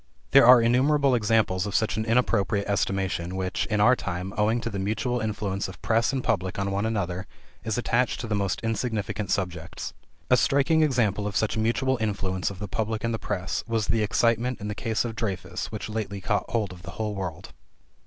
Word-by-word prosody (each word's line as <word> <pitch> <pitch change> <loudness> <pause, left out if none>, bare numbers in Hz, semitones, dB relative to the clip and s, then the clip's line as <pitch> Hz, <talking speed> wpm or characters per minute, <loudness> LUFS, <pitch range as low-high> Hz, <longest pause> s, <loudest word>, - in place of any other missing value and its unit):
There 135 -3 +7
are 125 0 +10
innumerable 135 +4 +3
examples 105 -5 +2
of 100 - -4
such 110 - +1
an 110 +1 -1
inappropriate 110 -4 +1
estimation 95 -3 -1
which, 95 0 -2
in 105 -1 0
our 120 +5 +6
time, 90 -3 -4
owing 110 +3 +2
to 115 - -3
the 100 - -3
mutual 110 +5 -1
influence 105 -3 -2
of 95 - -10
press 115 +2 +2
and 135 -2 -2
public 95 -4 -1
on 100 0 -1
one 100 +3 0
another, 95 -4 -2 0.4
is 110 0 -2
attached 120 +1 +1
to - - -4
the 110 - -1
most 100 -2 0
insignificant 110 -3 -2
subjects. 90 -3 -3 0.4
A - - +7
striking 140 +4 +3
example 115 -8 +1
of 105 - -5
such 110 - +1
mutual 120 +4 +1
influence 95 -3 -1
of 100 - -8
the 105 - -5
public 110 +3 -2
and 115 0 0
the 110 - -2
press 95 -3 -3
was 115 -2 0
the 115 - +2
excitement 115 +3 +1
in 105 0 -5
the - - -2
case 110 +1 -1
of 115 -2 -4
Dreyfus, 100 -5 -4
which - - -5
lately 105 -2 -4
caught 100 +2 -1
hold 105 -5 -1
of 90 - -12
the 85 -2 -8
whole 110 -1 -2
world. 95 -5 -6
105 Hz, 205 wpm, -26 LUFS, 95-115 Hz, 0.4 s, are